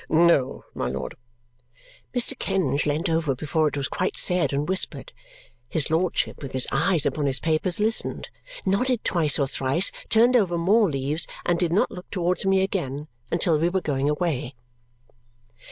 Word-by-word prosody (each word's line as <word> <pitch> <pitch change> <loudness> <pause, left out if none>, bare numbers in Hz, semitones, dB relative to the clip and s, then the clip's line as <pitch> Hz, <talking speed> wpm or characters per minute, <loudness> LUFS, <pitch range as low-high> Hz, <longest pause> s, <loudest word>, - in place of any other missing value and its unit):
"No, 160 -5 +2
my - - -3
lord." - - -5 1.0
Mr. 250 +2 +2
Kenge 155 -8 0
leant 150 +2 0
over 160 -4 0
before 155 +3 0
it 145 - -3
was 140 - -1
quite 185 - -2
said 180 -2 +2
and 145 +1 -1
whispered. 190 +1 -1 0.6
His 155 -1 -1
lordship, 170 +2 0
with 135 -2 -7
his 130 -1 +3
eyes 155 +2 +2
upon 150 -2 0
his 130 -1 +1
papers, 165 +3 +1
listened, 220 +2 0 0.4
nodded 230 +5 0
twice 160 -5 +2
or 140 - +1
thrice, 135 +6 +1 0.2
turned 235 +3 +4
over 185 -7 +2
more 200 +4 +3
leaves, 145 +3 -2 0.2
and 175 -1 +1
did 175 -3 0
not 190 - +2
look 180 - -10
towards 180 0 -1
me 195 0 +3
again 150 -7 -3 0.2
until 170 -1 +2
we 170 +2 +2
were 190 +1 0
going 145 -4 -1
away. 150 -5 -2
165 Hz, 165 wpm, -24 LUFS, 145-190 Hz, 1.0 s, turned